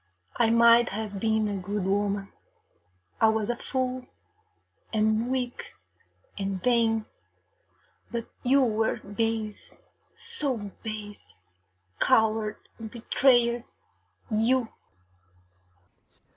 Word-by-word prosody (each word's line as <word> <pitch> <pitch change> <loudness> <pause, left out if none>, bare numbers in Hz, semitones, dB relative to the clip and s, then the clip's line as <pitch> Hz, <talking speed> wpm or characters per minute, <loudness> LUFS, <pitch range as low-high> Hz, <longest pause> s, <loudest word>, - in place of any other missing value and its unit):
I 225 - +3
might 235 +1 +6
have 205 -1 -4
been 220 0 +1
a 200 -1 -2
good 200 +2 -3
woman. 200 0 -1 0.9
I 220 - +7
was 220 0 +1
a - - -3
fool, 255 0 -3 0.8
and 220 +2 +1
weak, 250 -2 -3 0.6
and 195 -1 -2
vain, 225 -3 +2 1.0
but 235 -1 -3 0.2
you 270 +2 +4
were 220 -2 +1
base 215 +1 -3 0.4
so 300 - -1 0.2
base 210 - -8 0.6
coward 220 -3 +2
and 225 -1 -6
betrayer, 240 0 +2 0.7
you! 230 +2 +2
225 Hz, 90 wpm, -27 LUFS, 215-240 Hz, 1.0 s, I